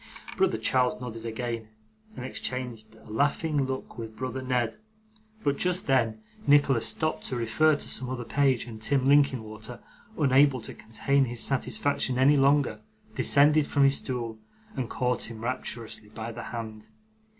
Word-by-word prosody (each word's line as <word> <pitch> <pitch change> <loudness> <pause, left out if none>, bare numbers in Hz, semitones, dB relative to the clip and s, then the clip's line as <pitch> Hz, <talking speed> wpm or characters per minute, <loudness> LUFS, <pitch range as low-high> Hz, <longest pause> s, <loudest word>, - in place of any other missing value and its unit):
Brother 190 -12 +2
Charles 125 +3 +1
nodded 115 -2 -6
again, 115 -1 -4 0.5
and 125 - -6
exchanged 120 -4 -5
a 110 - -18
laughing 145 +3 +1
look 130 -2 -5
with 110 -1 -7
brother 130 0 -4
Ned; 125 -3 -1 0.7
but, 140 -1 +1
just 180 0 0
then, 115 -5 +1 0.2
Nicholas 140 -5 +5
stopped 155 +7 0
to 130 - 0
refer 125 +7 +3
to - - -4
some 125 - -3
other 130 -1 -4
page, 135 -2 +1
and 110 -2 -10
Tim 135 +2 +1
Linkinwater, 125 -5 +1 0.4
unable 140 -2 +4
to - - -6
contain 115 +5 0
his 120 -2 -1
satisfaction 135 0 0
any 135 +3 +5
longer, 140 -5 +3 0.3
descended 150 +1 +4
from 140 - +2
his 135 0 +5
stool, 115 -4 -4 0.4
and 130 -4 -3
caught 125 -2 -1
him 115 -1 -9
rapturously 115 -3 -3
by 110 +2 -6
the 120 - -7
hand. 110 -2 -7
125 Hz, 150 wpm, -27 LUFS, 115-140 Hz, 0.7 s, Nicholas